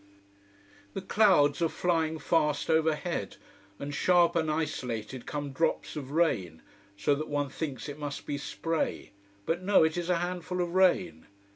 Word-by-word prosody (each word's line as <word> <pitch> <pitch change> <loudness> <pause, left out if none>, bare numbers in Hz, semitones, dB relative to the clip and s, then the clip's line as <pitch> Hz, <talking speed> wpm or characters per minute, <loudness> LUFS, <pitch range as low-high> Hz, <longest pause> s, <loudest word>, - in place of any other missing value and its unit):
The - - -4
clouds 190 -9 +4
are 165 - +3
flying 160 -2 0
fast 155 -1 +1
overhead: 160 - 0 0.4
and 140 +4 -5
sharp 175 +3 +3
and 160 -2 +1
isolated 130 -6 -3
come 145 -1 -4
drops 160 +4 -1
of 140 -3 -6
rain, 115 - 0 0.3
so 145 - +2
that 150 +2 -3
one 145 -1 -1
thinks 135 -2 -5
it 145 0 -7
must 145 -1 -5
be 145 -1 -3
spray. 165 +2 -3 0.3
But 170 +2 -1
no, 195 -2 +5
it 160 +1 +1
is 175 0 -3
a 180 - +3
handful 180 +1 -3
of 175 -1 -1
rain. 180 - +2
160 Hz, 155 wpm, -29 LUFS, 145-170 Hz, 0.4 s, no